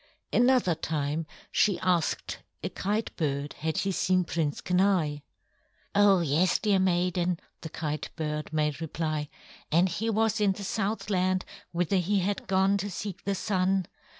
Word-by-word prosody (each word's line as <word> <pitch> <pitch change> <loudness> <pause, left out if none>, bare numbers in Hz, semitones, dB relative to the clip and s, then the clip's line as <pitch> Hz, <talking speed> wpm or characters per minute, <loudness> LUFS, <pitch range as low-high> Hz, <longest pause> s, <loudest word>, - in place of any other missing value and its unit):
Another 245 -7 +4
time 155 0 -2 0.2
she 200 -4 +3
asked 175 -4 0 0.2
a - - -1
Kite 210 +4 -2
bird 145 -2 -1
had 160 +1 -1
he 195 - +1
seen 185 0 +2
Prince 160 -4 -1
Kenai. 180 -5 +2 0.7
"Oh, 200 -2 +5
yes, 165 +4 +2
dear 205 -3 +2
maiden," 180 -1 +1 0.2
the 160 - -6
Kite 155 -1 -3
bird 150 -2 -3
made 150 0 0
reply. 155 -2 -2 0.4
"And 170 +4 +4
he 195 +6 -2
was 225 0 +1
in 200 -2 +4
the 200 - -8
Southland, 190 -3 0 0.3
whither 180 +2 +1
he 190 +3 +1
had 200 +2 -2
gone 190 +1 +3
to 205 +1 -3
seek 195 0 -6
the 200 0 0
Sun. 190 -1 +1
180 Hz, 150 wpm, -28 LUFS, 160-195 Hz, 0.7 s, Oh